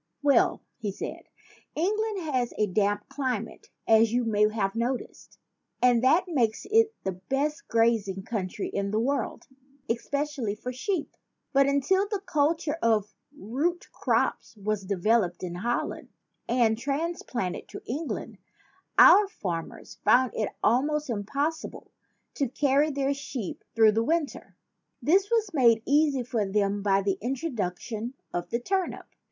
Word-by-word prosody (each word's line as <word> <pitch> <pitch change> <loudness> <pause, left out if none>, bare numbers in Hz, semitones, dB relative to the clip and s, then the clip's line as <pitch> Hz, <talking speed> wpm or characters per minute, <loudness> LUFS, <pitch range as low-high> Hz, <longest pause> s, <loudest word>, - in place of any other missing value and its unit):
"Well," 280 -4 +3 0.2
he 210 -4 -2
said, - - -7 0.5
"England 415 +4 0
has 255 -6 -1
a 210 - +3
damp 205 +1 0
cli 260 -4 -1
mate, 225 +2 -10 0.2
as 220 0 +5
you 245 +1 +1
may 210 -2 +3
have 195 -3 -1
noticed; 240 +3 -4 0.4
and 245 -1 +4
that 315 +8 +5
makes 240 -10 0
it 450 0 +4
the 190 - -1
best 275 - -2
grazing 225 -4 +1
country 200 -3 -3
in 200 0 -2
the 215 +2 0
world 275 +5 -1 0.4
es 230 -1 -3
pecially 280 -7 -2
for 250 +3 -5
sheep. 320 +6 -3 0.4
But 275 0 +5
until 285 +9 +2
the 410 -1 -2
culture 310 0 +1
of 215 -3 +1 0.2
root 290 - -2
crops - - -1
was 205 -1 -2
developed 200 -1 +1
in 175 -1 -4
Holland 235 +7 -3 0.4
and 235 -2 +2
trans 300 +6 -2
planted 190 -8 -4
to - - -9
England, 290 +5 -4 0.6
our 410 0 +8
farmers 175 - -6
found 245 +4 +4
it 215 - -1
almost 295 +4 +2
impossible 280 +10 -3 0.4
to 275 -5 -1
carry 285 +3 +2
their 280 -1 0
sheep 275 -7 -6
through 220 -1 +6
the 225 +2 +1
winter. 320 +2 -2 0.4
This 385 +6 +3
was 445 -5 +1
made 235 -6 +4
easy 285 -2 +3
for 235 -3 -1
them 200 0 0
by 195 -1 +2
the 195 -1 0
introduction 235 - -3 0.2
of 175 0 -3
the 235 - -1
turnip. 380 +7 -2
245 Hz, 145 wpm, -27 LUFS, 210-295 Hz, 0.6 s, our